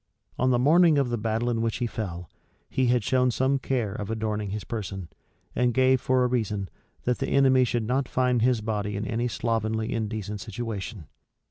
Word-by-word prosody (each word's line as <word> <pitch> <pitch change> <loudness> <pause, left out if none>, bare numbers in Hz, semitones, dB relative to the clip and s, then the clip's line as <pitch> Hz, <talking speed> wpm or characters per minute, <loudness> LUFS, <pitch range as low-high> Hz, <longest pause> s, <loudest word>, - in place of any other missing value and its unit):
On 130 - +3
the 125 - +3
morning 160 +5 +5
of 135 -4 +1
the 120 - 0
battle 110 +2 -1
in 115 -2 0
which 115 -1 0
he 125 - -1
fell, 90 -7 -5 0.4
he 130 -1 0
had 120 -2 +2
shown 125 +3 +2
some 130 +4 +1
care 120 -7 -1
of 105 -1 -5
adorning 110 -2 -2
his 105 +1 -4
person; 95 -6 -5 0.5
and 125 -1 +1
gave 130 0 +4
for 130 0 +2
a - - +3
reason, 105 -6 -1 0.3
that 125 0 0
the 135 - -1
enemy 130 -2 +5
should 120 -1 0
not 130 +3 0
find 125 -2 +1
his 120 -1 +2
body 105 -2 -2
in 105 - -3
any 120 +1 -1
slovenly, 110 0 -1
indecent 105 -2 -3
situation. 110 -4 -5
115 Hz, 195 wpm, -26 LUFS, 105-125 Hz, 0.5 s, morning